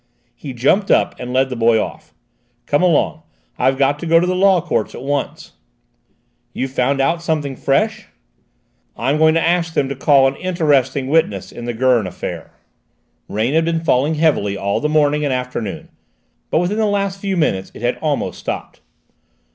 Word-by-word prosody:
He 140 - -8
jumped 140 - +1
up - - +3
and 125 0 -6
led 130 +1 +2
the - - -3
boy 115 -1 +3
off. - - -6 0.5
"Come 145 - +1
along: 160 -3 +2 0.4
I've 130 0 +2
got 140 +2 +1
to 170 - -5
go 165 +1 +5
to 175 - +1
the 180 - 0
Law 190 0 +4
Courts 115 - -2
at - - -8
once." 140 0 -3 1.0
"You've 135 0 -3
found 135 +1 0
out 165 +5 +1
something 155 -5 -2
fresh?" 215 - 0 0.9
"I'm 135 +6 0
going 160 0 +4
to 165 - +2
ask 170 -1 0
them 135 - +1
to 140 - -4
call 135 0 +4
an 135 - -2
interesting 145 -7 +1
witness 130 - 0
in 120 - -8
the 120 - -3
Gurn 120 -4 +2
affair." - - -6 0.8
Rain 110 +6 -1
had 160 +1 +3
been 165 -1 -1
falling 145 +1 +2
heavily 145 -11 +1
all 100 +1 -1
the 150 - -1
morning 150 -1 +2
and 145 - 0
afternoon, 125 -5 -4 0.6
but - - +1
within 180 +5 0
the 220 - +2
last 200 -1 -1
few 195 -1 -2
minutes 95 - 0
it - - -10
had 120 - 0
almost 150 -3 -2
stopped. - - -6
145 Hz, 180 wpm, -18 LUFS, 130-165 Hz, 1.0 s, go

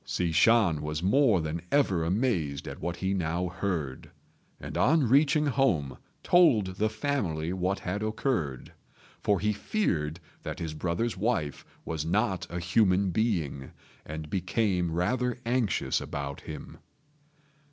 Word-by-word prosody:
Hsi 85 -2 -1
Shan 95 -3 +4
was 75 +2 -3
more 110 - +4
than 80 +2 -3
ever 100 - +2
amazed 85 - 0
at - - -7
what 85 0 -2
he 95 +2 -1
now 90 0 -1
heard, 85 -7 -3 0.5
and - - -7
on 155 -4 +3
reaching 145 +4 +4
home 125 - +1 0.3
told 110 - +4
the 110 +2 +2
family 95 - -2
what 95 +1 0
had 95 +4 -3
occurred; 110 - -2 0.5
for 100 -2 +2
he 105 +2 +1
feared 85 - -1 0.2
that - - -5
his 80 -2 -4
brother's 90 +8 -2
wife 90 - -1 0.2
was 80 -2 -3
not 95 +1 0
a 85 - -4
human 95 +1 +2
being, 85 - -1 0.3
and 80 0 -6
became 90 -1 0
rather 125 +10 0
anxious 120 -3 0
about 70 -1 -5
him. - - -9
95 Hz, 135 wpm, -28 LUFS, 80-115 Hz, 0.5 s, Shan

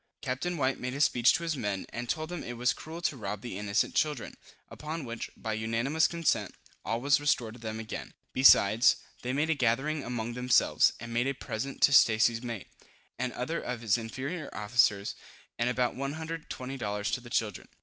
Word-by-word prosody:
Captain 140 +7 -2
White 135 -2 0
made 125 +1 -4
a - - -4
speech 130 -1 +5
to 170 - -1
his 165 -2 -1
men, 100 -7 -2
and 120 0 -6
told 155 +3 -2
them 175 -2 -5
it 120 -1 -6
was 125 +1 +2
cruel 165 +2 -9
to 155 - +1
rob 105 -4 -5
the 120 -5 -6
innocent 100 +1 0
children; 150 -5 -1 0.3
upon 155 0 -6
which, 115 -1 -5
by 110 - -3
unanimous 115 +8 +1
consent, 150 - 0 0.3
all 115 - -1
was 140 +3 +3
restored 125 -6 +1
to 120 - -12
them 110 -1 -5
again. 110 - -7 0.2
Besides, 115 -4 +6 0.3
they 125 - -2
made 150 +4 +1
a - - +5
gathering 135 +3 0
among 120 -1 -3
themselves, 125 +1 +3
and 115 +1 -7
made 120 +3 +1
a 140 - -1
present 130 +2 -4
to 140 - +6
Stacy's 115 -2 +5
mate, 115 -5 -5 0.5
and 130 0 -1
other 145 +7 -3
of 125 -2 -4
his 110 -4 +3
inferior 135 +8 -4
officers, 105 -2 +2 0.5
and 120 +1 +2
about 125 -1 +1
120 140 -1 -5
dollars 105 -2 -2
to 125 - -1
the 120 - -11
children. 110 -4 -1
125 Hz, 190 wpm, -30 LUFS, 115-140 Hz, 0.5 s, Besides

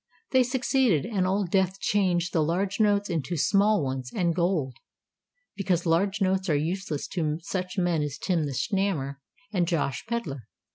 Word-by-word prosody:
They 260 - +5
succeeded, 250 - +2
and 200 -4 0
Old 190 -2 0
Death 190 0 +1
changed 185 -4 +1
the 160 - +3
large 185 +7 0
notes 205 -1 +3
into 170 0 -2
small 200 +3 +3
ones 130 -2 -3
and 175 -5 +1
gold; 170 -7 0 0.8
because 180 -3 0
large 190 +5 +1
notes 190 0 +1
are 155 - +3
useless 160 0 -2
to 155 -4 -1
such 185 +2 -4
men 175 -4 +1
as 145 -1 -3
Tim 170 -3 0
the 140 - -4
Snammer 160 - -1 0.4
and 175 -3 +1
Josh 160 -6 -1
Pedler. 150 - -4
180 Hz, 160 wpm, -27 LUFS, 155-200 Hz, 0.8 s, They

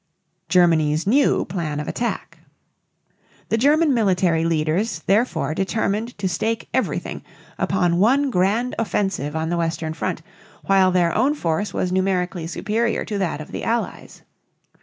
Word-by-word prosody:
GERMANY'S 160 -4 +3
NEW 270 +8 +3
PLAN 165 -5 -3
OF 150 - -5
ATTACK. 240 - -4 1.1
The 225 - +2
German 295 +3 +4
military 180 -7 +2
leaders 165 +3 0
therefore 195 - +1
determined 215 +5 -1
to 200 -2 -1
stake 220 +6 -2
everything - - -2 0.4
upon 175 -3 +1
one 265 +7 +3
grand 215 +6 +1
offensive 195 -9 -1
on 160 0 -1
the 175 - 0
western 165 -1 -2
front - - -3 0.4
while 195 -1 +4
their 175 -2 +2
own 270 +6 +2
force 175 - -1
was 180 - -2
numerically 185 -2 0
superior 220 +6 -1
to 205 -3 -3
that 170 -5 -2
of 155 - -10
the - - -5
Allies. 230 +1 -3
190 Hz, 140 wpm, -22 LUFS, 165-225 Hz, 1.1 s, German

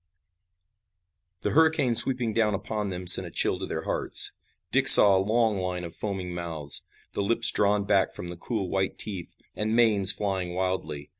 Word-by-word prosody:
The - - -4
hurricane 160 -5 0
sweeping 120 -1 +6
down 105 -2 -2
upon 105 +1 -7
them 90 -1 -9
sent 90 - +6
a - - -11
chill - - -2
to - - -8
their - - -7
hearts. - - +1 0.4
Dick - - -1
saw 100 -2 +9
a 95 - 0
long 110 0 -2
line 90 -1 -6
of 85 - -10
foaming 95 -4 -7
mouths, 80 -4 -4 0.3
the - - -6
lips 115 +3 +1
drawn 105 0 -1
back 100 -1 -1
from 90 - -11
the 85 - -9
cruel 100 +2 -7
white 95 +1 -5
teeth, 95 -5 -6 0.2
and 110 +1 -4
manes 105 -5 +2
flying 95 -3 -5
wildly. 90 -6 -6
100 Hz, 175 wpm, -23 LUFS, 90-110 Hz, 0.4 s, saw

